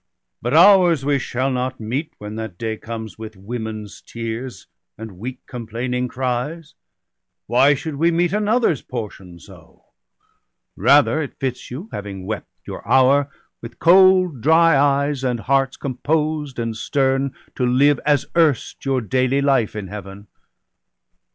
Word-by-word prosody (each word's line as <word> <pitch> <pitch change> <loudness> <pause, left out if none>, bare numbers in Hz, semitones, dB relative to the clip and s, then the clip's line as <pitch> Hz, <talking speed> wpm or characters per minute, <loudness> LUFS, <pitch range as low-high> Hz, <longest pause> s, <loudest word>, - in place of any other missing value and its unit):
But 120 +5 -1
ours 175 -5 +6
we 145 -1 +2
shall 130 +2 -2
not 130 0 -3
meet, 125 +8 -3
when 105 0 -8
that 110 -6 -6
day 110 +1 -3
comes, 110 -2 -8
With 110 -1 -8
women's 110 +1 -7
tears 115 +2 -6 0.3
and 110 -5 -10
weak 125 +4 -7
complaining 125 +1 -4
cries 130 +6 -3 0.4
— - - -62 0.3
Why 135 +5 +4
should 145 +1 -6
we 165 +3 +3
meet 170 +2 +1
another's 210 - +1
portion 100 -7 -7
so? 85 - -17 0.9
Rather 145 - +4
it 140 - -7
fits 130 -2 -4
you, 145 - -7
having 100 -2 -7
wept 110 +1 -5 0.2
your - - -7
hour. 135 +2 +4 0.3
With 115 - -10
cold 185 -5 +5
dry 165 +4 +5
eyes, 140 0 +1
and 125 -3 -1
hearts 135 0 +1
composed 150 +1 -2
and 115 -1 -3
stern, 135 +2 0 0.2
To 130 - -3
live, 130 +3 +3
as 145 -1 +2
erst, 160 -6 +1
your 135 -2 0
daily 130 +4 +1
life 135 -7 +1
in 105 -2 -4
Heaven. 100 +1 -9
130 Hz, 145 wpm, -20 LUFS, 115-145 Hz, 0.9 s, ours